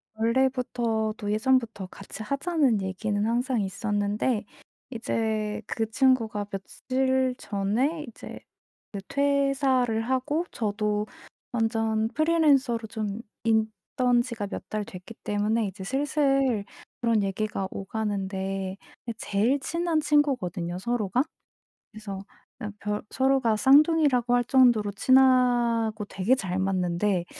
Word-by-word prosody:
원래부터도 230 -3 0
예전부터 220 -2 +1
같이 195 +3 -9
하자는 280 - +1
얘기는 205 +2 -2
항상 245 +1 0
있었는데 205 +3 -1 0.5
이제 220 -2 -2
그 225 -1 -2
친구가 230 -6 +2
며칠 260 +6 -1
전에 235 +11 -1
이제 235 - -10 0.5
그 200 - -5
퇴사를 275 -4 +1
하고 260 +7 0
저도 210 -1 -1 0.5
완전 225 -1 0
프리랜서로 280 -7 +2
좀 215 -1 -4 0.2
있던 230 +3 +1
지가 235 -5 -5
몇 - - -7
달 215 -1 -2
됐기 185 +4 -10
때문에 210 +2 0
이제 190 0 -8
슬슬 270 -2 +1 0.4
그런 230 -3 +2
얘기가 195 0 -2
오가는데 195 -2 -3 0.3
그 230 - -2
제일 225 +8 +1
친한 335 +2 0
친구거든요 250 - 0
서로가. 235 +2 0 0.7
그래서 205 -3 -7 0.4
그냥 210 - -5
별 210 0 -2
서로가 265 -4 +2
쌍둥이라고 275 -1 +4
할 245 - +3
정도로 240 -5 +4
친하고 240 -2 +3
되게 205 +5 +1
잘 185 -7 -3
맞는데 185 -1 0
225 Hz, 250 characters per minute, -26 LUFS, 205-260 Hz, 0.7 s, 쌍둥이라고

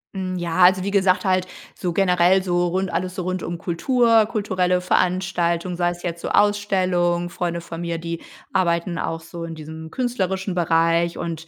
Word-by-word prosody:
Hm, 185 -1 -3
ja, 170 -1 -3
also, 185 0 +5
wie 200 - -2
gesagt, 190 -1 +2
halt 185 -1 +1 0.3
so 180 - -3
generell 180 0 +3
so 175 -1 +1
rund 190 +2 -2
alles 180 +1 -2
so 185 - -3
rund 185 0 -2
um 175 - -4
Kultur, 225 +6 +2
kulturelle 185 -5 0
Veranstaltungen, 180 -1 0
sei 175 0 +1
es 175 0 -7
jetzt 170 -1 -4
so - - -3
Ausstellung 185 -4 +1
Freunde 170 -1 -3
von 170 0 -7
mir, 170 -1 -2
die 170 0 -5 0.3
arbeiten 170 -2 0
auch 165 0 -3
so 165 +1 -8
in 165 -1 -6
diesem 160 +1 -9
künstlerischen 195 -5 -2
Bereich 170 0 +2
und 165 -1 -5
180 Hz, 180 wpm, -22 LUFS, 170-190 Hz, 0.3 s, also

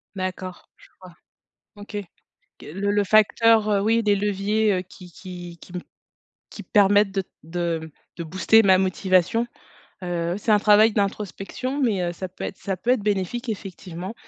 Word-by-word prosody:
D'accord, 185 -1 -6
je - - -19
vois. 180 -2 -13 0.6
OK. 205 +1 -8 0.6
Que - - -13
le 195 +7 -2
le 205 0 +2
facteur, 215 +1 +4
heu, 200 -1 +2
oui 225 +3 +2
des 205 -2 +2
leviers, 205 +2 +1
heu, 185 - 0
qui 180 -1 -15
qui 175 -1 -10
qui - - -14
m 180 - -3 0.7
qui - - -9
permettent 205 -1 +4
de 195 0 -1
t 185 - -20
de 165 -1 -3 0.3
de 170 - -4
booster 190 +6 +4
ma 190 -2 +5
motivation, 185 +4 +1 0.6
heu, 175 -1 -2
oui 185 - -3
c'est 220 - -2
un 210 - +6
travail 210 +1 +5
d'introspection, 210 +6 -3
mais, 215 -8 +1
heu, 175 -1 -1
ça 185 +2 -6
peut 180 - -12
être - - -5
ça 195 -1 -3
peut 230 +7 -2
être 250 -4 +2
bénéfique 210 +4 -2
effectivement, 190 -2 -6
195 Hz, 175 wpm, -23 LUFS, 180-210 Hz, 0.7 s, un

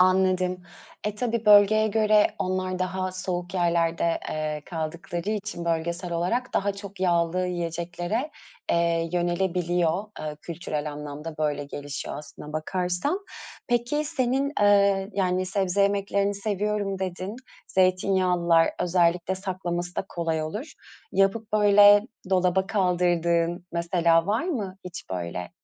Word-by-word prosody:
Anladım. 185 -1 +3 0.4
E, 210 0 -1
tabii, 230 0 -2
bölgeye 210 +1 +6
göre 215 0 +4
onlar 185 0 -1
daha 185 0 -2
soğuk 180 -1 -4
yerlerde, 170 -1 +1
eee, 155 -1 -3
kaldıkları 170 +3 -4
için 210 -5 -4
bölgesel 170 +2 -2
olarak 185 +10 -1
daha 200 +1 +1
çok 200 -1 -10
yağlı 175 0 +1
yiyeceklere, 175 - -3 0.4
eee, 170 -1 +1
yönelebiliyor, 175 0 0 0.2
eee, 150 -1 -5
kültürel 155 -3 -4
anlamda 150 +2 -7
böyle 145 -2 -1
gelişiyor 145 0 -6
aslına 150 0 -10
bakarsan. 180 - -1 0.5
Peki 245 +5 +1
senin, 275 -2 0
eee, 200 -1 +4
yani 185 -1 0
sebze 195 0 +1
yemeklerini 200 0 +1
seviyorum 205 -1 -2
dedin. 185 +3 -4 0.3
Zeytinyağlılar 185 -2 +3
özellikle 175 +1 +2
saklaması 180 -2 -4
da - - -1
kolay 165 -2 -2
olur. 210 - -5 0.4
Yapıp, 195 +3 +1
böyle, 205 -1 +7 0.3
dolaba 185 0 +2
kaldırdığın 175 -2 +1
mesela 170 0 +2
var 215 +6 +1
mı 210 - -3
hiç, 180 - -8
böyle, 90 -1 -4
185 Hz, 115 wpm, -26 LUFS, 170-200 Hz, 0.5 s, böyle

